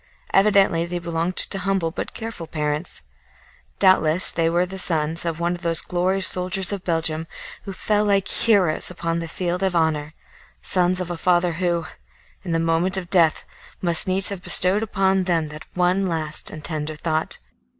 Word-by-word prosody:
Evidently 195 -4 +4
they 175 +1 -4
belonged 170 +1 -3
to 195 - +3
humble 185 -3 -1
but - - -6
careful 220 -7 -7
parents. 150 +1 -4 0.7
Doubtless 185 -3 +4
they 165 0 0
were 175 +2 +1
the 190 +1 -8
sons 160 -1 +1
of 165 -1 -3
one 170 +1 0
of 175 - -7
those 165 -2 +2
glorious 185 +2 +1
soldiers 185 +1 +1
of 200 -2 -4
Belgium 165 -1 -1 0.4
who 200 - -5
fell 210 +2 0
like 200 -2 +1
heroes 195 -8 +2
upon 170 -2 -3
the 165 - -5
field 180 +2 -3
of 190 -2 0
honour 155 -2 0 0.5
sons 180 0 +1
of 180 -1 -4
a 175 - -4
father 175 +1 +2
who, 170 0 -1 0.6
in 180 - -5
the 165 - +1
moment 165 +3 +1
of 180 -2 -6
death, 165 -5 +3 0.3
must 170 -1 +1
needs 185 0 0
have 200 -3 -6
bestowed 185 +4 +2
upon 195 -3 +1
them 165 -4 0 0.2
one 180 +2 +1
last 155 -3 -2
and 155 - -9
tender 155 0 -3
thought. 155 +1 -1
175 Hz, 170 wpm, -22 LUFS, 165-190 Hz, 0.7 s, Evidently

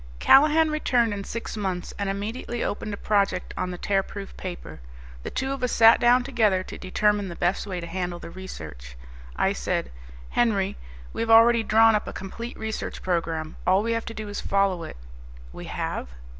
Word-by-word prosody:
Callahan 305 - +5
returned 245 -7 +1
in 200 -1 -4
six 230 +3 -5
months 190 -4 -3
and 200 -1 -1
immediately 220 +4 -3
opened 210 +1 -3
a 205 - -4
project 200 -4 0
on 185 - -2
the 180 - -5
Tearproof 195 +1 -2
Paper. 175 - -7 0.4
The - - -5
two 265 +1 -2
of 275 -1 -4
us 250 - 0
sat 225 0 +7
down 245 +1 +5
together 220 -8 +2
to - - -9
determine 205 +2 +1
the 170 - -7
best 180 +4 0
way 185 -2 -3
to 170 - -6
handle 175 0 -3
the 170 - -10
research. 75 - -9 0.4
I - - +1
said, 65 0 -2 0.4
"Henry, 210 -5 +1 0.4
we - - -3
have 230 - -2
already 230 +1 +7
drawn 225 +1 +5
up 210 - 0
a - - -5
complete 230 +5 -7
research 220 0 -5
program. 165 -3 -2
All 190 +3 +4
we 230 - -1
have 230 0 -1
to 230 - -6
do 215 -1 -6
is 205 - -5
follow 195 -3 +1
it." - - -9 0.6
"We - - -8
have?" - - -4
205 Hz, 190 wpm, -25 LUFS, 185-230 Hz, 0.6 s, sat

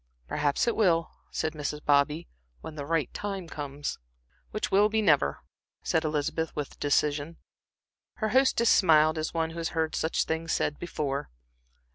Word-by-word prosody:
"Perhaps 145 - 0
it 235 - +2
will," 170 -6 +2 0.2
said 155 - -2
Mrs. 150 0 -4
Bobby, 150 +3 +2 0.3
"when - - -7
the 145 -2 -6
right 160 -4 0
time 195 -4 -4
comes." 145 -2 -5 0.5
"Which 215 - -3
will 205 +2 +5
be 220 +1 +1
never," 160 -10 +3 0.4
said 160 - +1
Elizabeth, 155 +1 -1
with 145 -2 -5
decision. 145 +2 0 0.8
Her 215 -2 -1
hostess 255 -2 +4
smiled 155 -3 +5
as 155 - -2
one 165 0 0
who 165 - -7
has 165 - -1
heard 160 -1 +1
such 160 - 0
things 160 0 -2
said 150 - -1
before. 140 - -3
160 Hz, 155 wpm, -28 LUFS, 150-170 Hz, 0.8 s, will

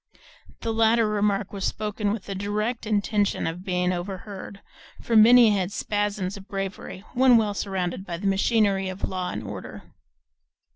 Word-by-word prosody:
The 225 - -2
latter 225 0 +3
remark 205 -1 0
was 195 - -5
spoken 210 -1 -2
with 210 -2 -4
the 200 - -5
direct 210 +4 -2
intention 205 -1 0
of 170 +3 -4
being 180 -1 0
overheard, 190 +2 -6 0.4
for 230 - -2
Minnie 230 +1 +8
had 190 -2 0
spasms 205 -2 -2
of 195 0 -11
bravery, 195 -1 -5
when 250 -1 +6
well 215 -2 +1
surrounded 190 -2 -3
by 175 -3 -5
the 195 - -7
machinery 195 -1 +2
of 185 +1 -4
law 185 -1 -3
and 105 - -5
order. 105 - -8
200 Hz, 155 wpm, -25 LUFS, 190-215 Hz, 0.4 s, Minnie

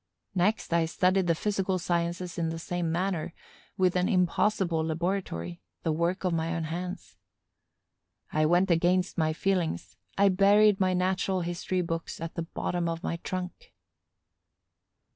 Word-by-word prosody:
Next 190 0 +1
I 170 -1 +3
studied 185 +3 +2
the 165 - +3
physical 195 0 0
sciences 175 +1 -2
in 165 -1 0
the 165 - -4
same 175 0 -2
manner, 175 -1 -1 0.4
with 185 -1 +2
an 180 +2 +2
impossible 180 -3 +2
laboratory, 160 - -2 0.2
the 160 - +1
work 170 +4 0
of 180 -2 +1
my 165 +1 -1
own 165 - -2
hands. 180 +4 -5 1.2
I 155 0 +3
went 175 +3 +3
against 180 +2 +2
my 155 -1 +2
feelings: 170 - -1 0.2
I 200 0 +5
buried 200 +2 +5
my 185 -1 +2
natural 185 +1 0
history 175 +1 -2
books 165 -1 -4
at 165 0 -5
the 170 - -3
bottom 170 +1 -2
of 165 +1 -4
my 170 - -2
trunk. 180 +1 -6
175 Hz, 145 wpm, -28 LUFS, 165-185 Hz, 1.2 s, I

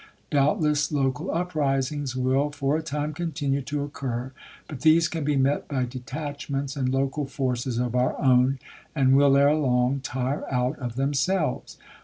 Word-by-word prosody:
Doubtless 150 0 +2
local 145 +4 -1
uprisings 145 -5 -1
will 130 +3 +1
for 145 0 -1
a 160 - 0
time 150 0 -3
continue 145 -4 -2
to 145 +2 -3
occur, 130 -3 -4 0.4
but 140 -5 -8
these 160 +3 +5
can 165 -2 -4
be 145 0 +1
met 135 +1 +1
by 130 -3 -1
detachments 140 +2 -5
and 130 -3 0
local 135 +2 -1
forces 125 -3 -2
of 120 -1 -1
our 125 0 +1
own, 130 0 +4 0.4
and 135 -2 +4
will 140 0 +5
ere 140 +1 +5
long 130 -2 +1
tire 130 +2 -3
out 125 +2 0
of 120 -3 -5
them 135 +2 0
selves. 155 0 -1
140 Hz, 160 wpm, -25 LUFS, 130-150 Hz, 0.4 s, these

